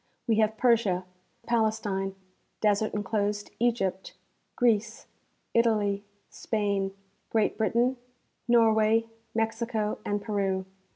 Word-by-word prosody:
We 225 Hz, -2 st, +3 dB
have 220 Hz, 0 st, +2 dB
Persia, 220 Hz, -7 st, +2 dB, 0.4 s
Pales 220 Hz, -2 st, +2 dB
tine, 195 Hz, -2 st, -2 dB, 0.4 s
desert 210 Hz, 0 st, +1 dB
inclosed 205 Hz, 0 st, -1 dB
Egypt, 220 Hz, -6 st, 0 dB, 0.4 s
Greece, 230 Hz, -2 st, +1 dB, 0.5 s
Italy, 210 Hz, -4 st, +2 dB, 0.2 s
Spain, 200 Hz, -3 st, -1 dB, 0.3 s
Great 220 Hz, -2 st, +1 dB
Britain, 235 Hz, +4 st, +1 dB, 0.5 s
Norway, 225 Hz, -1 st, +4 dB, 0.3 s
Mexico 225 Hz, -1 st, -1 dB
and 205 Hz, 0 st, -1 dB
Peru. 195 Hz, -3 st, -1 dB
215 Hz, 95 wpm, -28 LUFS, 205-230 Hz, 0.5 s, Norway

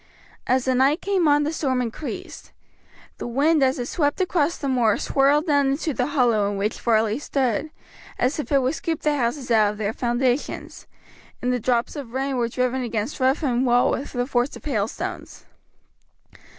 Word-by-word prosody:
As 255 Hz, 0 st, +2 dB
the 260 Hz, -, +2 dB
night 270 Hz, +5 st, +3 dB
came 385 Hz, -5 st, +1 dB
on 295 Hz, 0 st, +4 dB
the 305 Hz, +2 st, -2 dB
storm 265 Hz, -5 st, 0 dB
increased. 245 Hz, +5 st, -6 dB, 0.7 s
The -, -, -4 dB
wind 290 Hz, +6 st, +2 dB
as 265 Hz, 0 st, +2 dB
it 245 Hz, -, -3 dB
swept 290 Hz, +3 st, -1 dB
across 345 Hz, -3 st, +1 dB
the 280 Hz, -, -4 dB
moor 240 Hz, -5 st, +2 dB
swirled 285 Hz, +3 st, +2 dB
down 285 Hz, -4 st, +3 dB
into 285 Hz, +3 st, -1 dB
the 250 Hz, 0 st, -1 dB
hollow 240 Hz, -8 st, +2 dB
in 205 Hz, -, -3 dB
which 210 Hz, +2 st, -2 dB
Varley 220 Hz, 0 st, +2 dB
stood, 275 Hz, 0 st, -1 dB, 0.5 s
as 255 Hz, +5 st, 0 dB
if 300 Hz, -, -5 dB
it 275 Hz, -2 st, +3 dB
would 260 Hz, +3 st, +1 dB
scoop 325 Hz, -1 st, -3 dB
the 300 Hz, -1 st, +1 dB
houses 250 Hz, 0 st, -2 dB
out 215 Hz, -2 st, +4 dB
of -, -, -12 dB
their 215 Hz, 0 st, -2 dB
foundations, 245 Hz, +3 st, -2 dB, 0.5 s
and 250 Hz, 0 st, 0 dB
the 250 Hz, -, 0 dB
drops 240 Hz, 0 st, 0 dB
of 265 Hz, -6 st, -7 dB
rain 270 Hz, 0 st, -1 dB
were 235 Hz, -1 st, 0 dB
driven 255 Hz, +2 st, -1 dB
against 230 Hz, +3 st, -3 dB
roof 265 Hz, +4 st, +2 dB
and 250 Hz, -3 st, +1 dB
wall 245 Hz, -1 st, +3 dB
with 280 Hz, -, -4 dB
the 245 Hz, -1 st, -1 dB
force 245 Hz, 0 st, 0 dB
of -, -, -13 dB
hailstones. 220 Hz, -7 st, -4 dB
260 Hz, 190 wpm, -23 LUFS, 240-290 Hz, 0.7 s, on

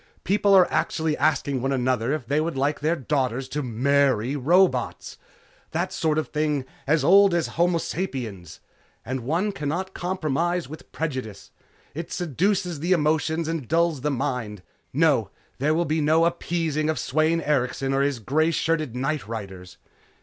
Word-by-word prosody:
People 200 Hz, 0 st, +3 dB
are 185 Hz, -2 st, +7 dB
actually 160 Hz, 0 st, 0 dB
asking 145 Hz, -4 st, +1 dB
one 135 Hz, +2 st, -1 dB
another 130 Hz, -2 st, 0 dB
if 150 Hz, -4 st, -2 dB
they 145 Hz, +5 st, +1 dB
would 160 Hz, -2 st, -3 dB
like 145 Hz, +2 st, 0 dB
their 155 Hz, +3 st, +1 dB
daughters 135 Hz, -3 st, -1 dB
to 150 Hz, -, -2 dB
marry 135 Hz, 0 st, +1 dB
robots. 175 Hz, +8 st, +1 dB, 0.5 s
That -, -, -1 dB
sort 155 Hz, -1 st, 0 dB
of 155 Hz, -, -1 dB
thing, 150 Hz, -3 st, -1 dB, 0.2 s
as 150 Hz, 0 st, +2 dB
old 195 Hz, +3 st, +6 dB
as 170 Hz, -, 0 dB
homo 175 Hz, +1 st, +1 dB
sapiens. 120 Hz, -, -5 dB, 0.4 s
And 130 Hz, +4 st, -3 dB
one 165 Hz, -, -1 dB
cannot 185 Hz, +3 st, -3 dB
compromise 175 Hz, -1 st, -1 dB
with 155 Hz, +3 st, -11 dB
prejudice. 130 Hz, -10 st, -5 dB, 0.4 s
It 165 Hz, +3 st, -6 dB
seduces 180 Hz, -, -1 dB
the 175 Hz, +5 st, +2 dB
emotions 160 Hz, 0 st, +1 dB
and 160 Hz, -6 st, -3 dB
dulls 165 Hz, -3 st, +1 dB
the 150 Hz, -, 0 dB
mind. 125 Hz, -8 st, -3 dB, 0.3 s
No, 140 Hz, -8 st, +2 dB, 0.3 s
there 150 Hz, +4 st, +2 dB
will 170 Hz, +1 st, +1 dB
be 155 Hz, 0 st, 0 dB
no 160 Hz, +3 st, +4 dB
appeasing 165 Hz, -3 st, -1 dB
of 160 Hz, -, 0 dB
Sweyn 155 Hz, +3 st, +1 dB
Erikson 135 Hz, -3 st, 0 dB
or 135 Hz, -, +2 dB
his 140 Hz, -2 st, +1 dB
grey 150 Hz, +8 st, +1 dB
shirted 155 Hz, -5 st, -1 dB
nightriders!" 110 Hz, -10 st, -4 dB
150 Hz, 155 wpm, -24 LUFS, 135-165 Hz, 0.5 s, are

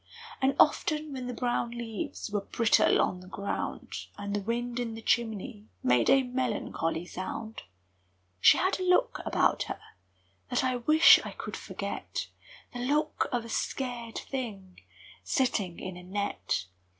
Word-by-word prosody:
And 265 Hz, 0 st, +3 dB
often 305 Hz, -1 st, +3 dB
when 255 Hz, -2 st, -5 dB
the 250 Hz, -, -3 dB
brown 240 Hz, -1 st, 0 dB
leaves 225 Hz, -3 st, -5 dB
Were 205 Hz, -1 st, 0 dB
brittle 230 Hz, +3 st, +3 dB
on 180 Hz, -, +1 dB
the 180 Hz, -, -13 dB
ground, 200 Hz, +2 st, -4 dB
And 205 Hz, 0 st, -3 dB
the 205 Hz, -, -1 dB
wind 240 Hz, +3 st, -2 dB
in 230 Hz, -2 st, -3 dB
the 225 Hz, -, -8 dB
chimney 220 Hz, -1 st, -1 dB, 0.2 s
Made 125 Hz, -2 st, +4 dB
a 270 Hz, 0 st, +6 dB
melancholy 235 Hz, -10 st, -2 dB
sound, 215 Hz, +5 st, -6 dB, 0.8 s
She -, -, +7 dB
had 375 Hz, +1 st, +1 dB
a -, -, -1 dB
look 370 Hz, +8 st, +3 dB
about -, -, +2 dB
her -, -, -4 dB, 0.7 s
That 245 Hz, -, +1 dB
I 255 Hz, -1 st, +1 dB
wish 310 Hz, +6 st, +7 dB
I -, -, -6 dB
could -, -, -6 dB
forget -, -, -5 dB, 0.4 s
The 245 Hz, -, -5 dB
look 295 Hz, +5 st, +1 dB
of 240 Hz, -2 st, -1 dB
a -, -, -9 dB
scared 240 Hz, -1 st, -3 dB
thing 205 Hz, -9 st, -5 dB, 0.4 s
Sitting 205 Hz, -10 st, 0 dB
in 185 Hz, -1 st, -6 dB
a 180 Hz, -, -9 dB
net! 195 Hz, -, -2 dB
235 Hz, 150 wpm, -29 LUFS, 200-260 Hz, 0.8 s, She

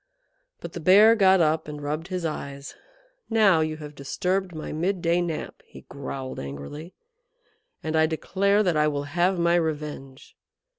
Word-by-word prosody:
But 170 Hz, -, -8 dB
the -, -, -5 dB
Bear 200 Hz, +7 st, +7 dB
got 190 Hz, -3 st, +5 dB
up 155 Hz, 0 st, +1 dB
and 150 Hz, -1 st, -7 dB
rubbed 150 Hz, +3 st, -4 dB
his 185 Hz, -3 st, -4 dB
eyes. 140 Hz, -3 st, -5 dB, 0.6 s
"Now 210 Hz, -7 st, +4 dB
you 155 Hz, 0 st, -1 dB
have 150 Hz, -1 st, -9 dB
disturbed 180 Hz, +6 st, -2 dB
my 155 Hz, -, -6 dB
midday 175 Hz, +1 st, 0 dB
nap," 170 Hz, -3 st, -5 dB
he 65 Hz, -, -14 dB
growled 135 Hz, -1 st, -6 dB
angrily, 70 Hz, -, -8 dB, 0.9 s
"and 160 Hz, -, -2 dB
I 160 Hz, 0 st, +4 dB
declare 200 Hz, +6 st, +1 dB
that 180 Hz, -4 st, +1 dB
I 150 Hz, 0 st, +3 dB
will 145 Hz, -1 st, -2 dB
have 175 Hz, +6 st, 0 dB
my 170 Hz, 0 st, +2 dB
revenge. 150 Hz, -5 st, -3 dB
160 Hz, 155 wpm, -25 LUFS, 150-180 Hz, 0.9 s, Bear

